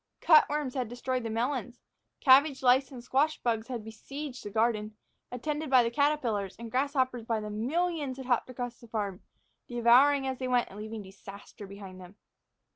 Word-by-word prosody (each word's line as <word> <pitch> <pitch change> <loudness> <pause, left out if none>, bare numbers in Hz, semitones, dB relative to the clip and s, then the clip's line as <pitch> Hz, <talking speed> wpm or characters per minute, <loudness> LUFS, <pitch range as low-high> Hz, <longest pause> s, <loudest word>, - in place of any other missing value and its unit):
Cutworms 300 -4 +4
had 255 -4 -2
destroyed 250 +1 -2
the 230 - -4
melons; 245 +2 -2 0.4
cabbage 275 0 +5
lice 255 +1 +4
and 250 -3 -9
squash 285 +5 +1
bugs 225 -2 0
had 245 -4 -5
besieged 260 +5 -8
the 205 - -6
garden, 215 0 0 0.3
attended 300 +4 -3
by 250 -3 +5
caterpillars; 240 -8 0
and 230 -1 -8
grasshoppers 260 -2 0
by 230 -1 0
the 210 0 -6
millions 285 +4 -1
had 265 - -7
hopped 245 0 0
across 245 -1 -6
the 235 - -15
farm, 205 -4 -4 0.5
devouring 250 +4 +4
as 265 -1 -3
they 255 - -2
went 250 -1 +1
and 200 - -10
leaving 215 0 -6
disaster 195 +1 -12
behind 195 -2 -10
them. 180 +2 -13
245 Hz, 170 wpm, -29 LUFS, 220-270 Hz, 0.5 s, cabbage